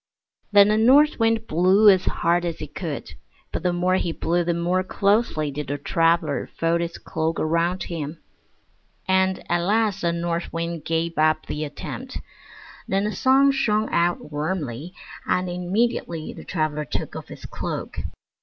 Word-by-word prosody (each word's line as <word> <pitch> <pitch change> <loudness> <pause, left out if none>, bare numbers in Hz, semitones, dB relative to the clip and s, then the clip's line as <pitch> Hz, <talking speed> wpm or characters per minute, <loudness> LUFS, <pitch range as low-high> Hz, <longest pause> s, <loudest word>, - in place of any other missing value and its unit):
Then 205 0 +7
the 215 +1 +3
North 275 +7 +5
Wind 225 0 +2
blew 185 +6 +4
as 190 -2 +6
hard 175 +1 +1
as 170 -2 -3
he - - -5
could, 150 -2 -6 0.4
but - - -3
the 180 +1 +1
more 180 +1 +1
he 170 - -1
blew 175 +1 0
the 170 0 0
more 175 +2 +1
closely 200 -6 +1
did 145 0 -5
the 145 +2 -2
traveler 165 +1 +1
fold 165 +1 +1
his 170 0 -4
cloak 160 +1 -2
around 170 +3 0
him; 160 -2 -5 0.9
and 190 0 +2
at 175 - +1
last 205 +2 +1
the 170 - +1
North 170 0 -2
Wind 165 -2 -4
gave 165 0 -1
up 155 0 +2
the 150 - -4
attempt. 240 - -6 0.7
Then 195 +1 +1
the 210 - -1
Sun 270 +4 +4
shined 215 -5 +1
out 170 -2 0
warmly, 150 -1 -3 0.3
and 180 0 +1
immediately 180 -2 -1
the - - -11
traveler 155 -3 -1
took 125 - -4
off - - -7
his - - -10
cloak. - - -5
175 Hz, 165 wpm, -23 LUFS, 160-195 Hz, 0.9 s, Then